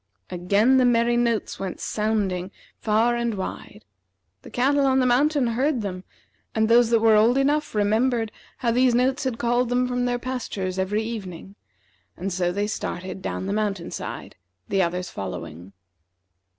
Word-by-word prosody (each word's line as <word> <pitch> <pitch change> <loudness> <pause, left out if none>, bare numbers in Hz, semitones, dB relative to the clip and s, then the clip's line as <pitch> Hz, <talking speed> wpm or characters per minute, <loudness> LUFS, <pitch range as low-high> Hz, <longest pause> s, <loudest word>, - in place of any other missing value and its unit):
Again 200 +8 +3
the 255 - +4
merry 240 0 +3
notes 235 -2 0
went 190 -2 -5
sounding 205 -4 -1 0.3
far 225 +2 +2
and 235 -2 -1
wide. 190 - -7 0.6
The - - -12
cattle 275 +3 +2
on 265 0 +3
the 260 - +3
mountain 275 +3 +3
heard 245 +2 0
them, 185 -2 -5 0.5
and 220 0 +2
those 235 0 +5
that 230 -1 +3
were 225 -1 +5
old 225 +4 +4
enough 290 -1 +1
remembered 225 +2 +1 0.3
how 235 - 0
these 250 0 +3
notes 260 +3 +1
had 255 -3 -1
called 240 +1 +1
them 250 0 +1
from 245 0 -1
their 245 0 0
pastures 225 -7 -4
every 205 +3 0
evening, 195 -5 -7 0.6
and 190 +1 -3
so 175 -1 0
they 200 +3 -1
started 190 -3 -5
down 185 - -4
the 195 - -2
mountain 205 -4 -2
side, - - -7 0.3
the 195 - +1
others 180 0 -2
following. 85 -2 -7
225 Hz, 165 wpm, -24 LUFS, 195-245 Hz, 0.6 s, those